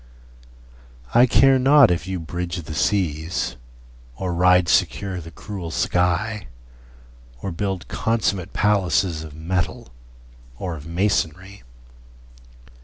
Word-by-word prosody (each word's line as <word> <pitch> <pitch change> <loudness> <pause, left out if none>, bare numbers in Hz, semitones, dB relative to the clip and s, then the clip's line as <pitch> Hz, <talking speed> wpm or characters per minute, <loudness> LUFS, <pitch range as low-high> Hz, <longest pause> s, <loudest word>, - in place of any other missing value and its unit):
I 120 +2 +6
care 135 +2 +5
not 135 -2 +6
if 85 0 -2
you 95 -1 -3
bridge 85 +1 -5
the 75 - -7
seas, 80 -4 -1 0.6
Or 90 +3 -3
ride 90 0 +4
secure 95 +3 +1
the 80 - -10
cruel 95 -1 -7
sky, 90 +6 0 1.0
Or 95 - -3
build 95 +1 -3
consummate 100 -5 -1
palaces 95 -5 +1
Of 75 -2 -10
metal 85 -1 -3 0.7
or 90 +2 -4
of 75 0 -10
masonry. 90 +1 -1
90 Hz, 110 wpm, -22 LUFS, 85-100 Hz, 1.0 s, I